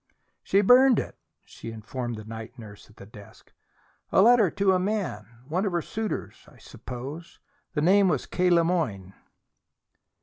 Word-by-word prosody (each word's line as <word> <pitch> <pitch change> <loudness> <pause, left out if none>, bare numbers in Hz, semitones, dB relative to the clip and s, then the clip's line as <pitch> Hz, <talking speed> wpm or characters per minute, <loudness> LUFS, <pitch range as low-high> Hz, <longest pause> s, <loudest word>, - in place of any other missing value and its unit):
"She 200 - +2
burned 250 +3 +6
it," - - -4 0.3
she 115 - -10
informed 120 +2 -6
the 110 - -9
night 110 +3 -9
nurse 105 -3 -13
at 105 - -22
her - - -12
desk. 105 +1 -16 0.6
"A - - +3
letter 225 -1 +5
to 195 +3 +1
a 185 - +2
man 185 - -3 0.2
one 175 +6 -1
of 200 -4 -2
her 170 -2 -1
suitors, 220 -1 -5
I - - -19
suppose. 140 +7 -9 0.4
The 150 - 0
name 195 +4 +4
was - - 0
K. 180 0 0
Le 170 -1 +4
Moyne." 110 - -2
165 Hz, 165 wpm, -26 LUFS, -, 0.6 s, burned